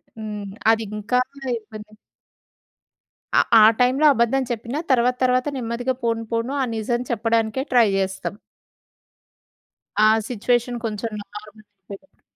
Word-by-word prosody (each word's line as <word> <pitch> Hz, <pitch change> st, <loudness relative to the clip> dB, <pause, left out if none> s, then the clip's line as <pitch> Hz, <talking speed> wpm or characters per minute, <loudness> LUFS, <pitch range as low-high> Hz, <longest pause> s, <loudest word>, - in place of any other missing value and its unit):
హ్మ్. 210 Hz, -2 st, -6 dB, 0.3 s
అదింకా 220 Hz, +2 st, -1 dB, 0.4 s
ఇబ్బంది. 215 Hz, -1 st, -12 dB, 1.4 s
ఆ -, -, +7 dB, 0.2 s
ఆ -, -, +8 dB, 0.2 s
టైంలో 255 Hz, +4 st, +3 dB
అబద్ధం 235 Hz, +2 st, +1 dB
చెప్పినా 235 Hz, +5 st, -4 dB
తర్వాత 250 Hz, 0 st, +3 dB
తర్వాత 255 Hz, +1 st, +2 dB
నెమ్మదిగా 245 Hz, +1 st, -2 dB
పోను 230 Hz, -1 st, -1 dB
పోను 230 Hz, +3 st, -1 dB
ఆ -, -, +1 dB
నిజం 240 Hz, +2 st, -1 dB
చెప్పడానికే 225 Hz, +1 st, 0 dB
ట్రై 240 Hz, -3 st, +6 dB
జేస్తాం. 190 Hz, 0 st, -3 dB, 1.7 s
ఆ -, -, +7 dB, 0.2 s
సిట్యుయేషన్ 240 Hz, +1 st, 0 dB
కొంచెం 220 Hz, +1 st, -3 dB
నార్మల్ 210 Hz, +1 st, -12 dB
అయ్యేలోగా. 200 Hz, +5 st, -15 dB
230 Hz, 110 wpm, -22 LUFS, 215-245 Hz, 1.7 s, ఆ